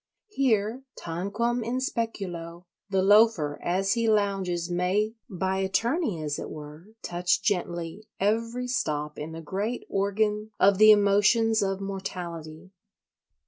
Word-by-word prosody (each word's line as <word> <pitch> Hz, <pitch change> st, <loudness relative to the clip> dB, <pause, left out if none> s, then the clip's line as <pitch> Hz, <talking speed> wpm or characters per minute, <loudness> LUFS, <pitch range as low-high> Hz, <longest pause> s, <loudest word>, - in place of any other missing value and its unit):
Here, 245 Hz, -, +1 dB, 0.2 s
tanquam 205 Hz, +8 st, -2 dB
in 235 Hz, +3 st, -2 dB
speculo, 185 Hz, -9 st, -4 dB, 0.3 s
the 190 Hz, -1 st, +1 dB
Loafer 205 Hz, -8 st, +4 dB
as 195 Hz, +3 st, +1 dB
he 230 Hz, -1 st, +1 dB
lounges 195 Hz, -5 st, 0 dB
may, 185 Hz, +5 st, 0 dB, 0.2 s
by 190 Hz, 0 st, -1 dB
attorney 225 Hz, -, 0 dB
as 145 Hz, -1 st, -2 dB
it -, -, -6 dB
were, 150 Hz, +3 st, -10 dB, 0.2 s
touch 175 Hz, +2 st, 0 dB
gently 175 Hz, 0 st, -2 dB
every 230 Hz, +5 st, 0 dB
stop 150 Hz, -11 st, -2 dB
in 155 Hz, +2 st, -5 dB
the 165 Hz, 0 st, -7 dB
great 205 Hz, +9 st, -3 dB
organ 210 Hz, +2 st, 0 dB
of 195 Hz, 0 st, +4 dB
the 215 Hz, 0 st, +8 dB
emotions 210 Hz, +2 st, +4 dB
of 195 Hz, -1 st, -1 dB
mortality. 180 Hz, -4 st, -6 dB
195 Hz, 125 wpm, -27 LUFS, 175-220 Hz, 0.3 s, the